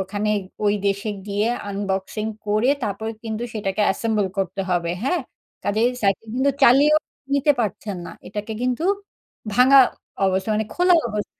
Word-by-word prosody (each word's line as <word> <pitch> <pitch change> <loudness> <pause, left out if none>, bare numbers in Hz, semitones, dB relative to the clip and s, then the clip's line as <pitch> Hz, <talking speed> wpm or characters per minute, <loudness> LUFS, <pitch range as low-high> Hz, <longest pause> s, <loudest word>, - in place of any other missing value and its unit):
ওখানে 205 +2 -2 0.3
ওই 205 0 +3
দেশে 200 +2 -1 0.2
গিয়ে 205 +2 0 0.2
আনবক্সিং 200 +1 -3 0.2
করে 215 +5 +2
তারপর 215 +1 -3 0.2
কিন্তু 220 0 -3
সেটাকে 200 -1 -2
assemble 215 -2 0
করতে 195 0 -1
হবে। 170 -1 0
হ্যাঁ? 345 +6 +1 0.4
কাজেই 220 +4 +2
সাইকেল 200 +2 +1
কিন্তু 270 +2 +3
চালিয়েও 285 +4 +6 0.4
নিতে 280 +1 +4
পারছেন 205 -2 -3
না। - - -7 0.2
এটাকে 210 +2 -5
কিন্তু 250 +5 0 0.7
ভাঙা 260 +3 +7 0.4
অবস্থা 190 +1 +1
মানে 215 0 0
খোলা 360 0 +4
অবছ 210 -2 -3
210 Hz, 140 wpm, -22 LUFS, 200-245 Hz, 0.7 s, ভাঙা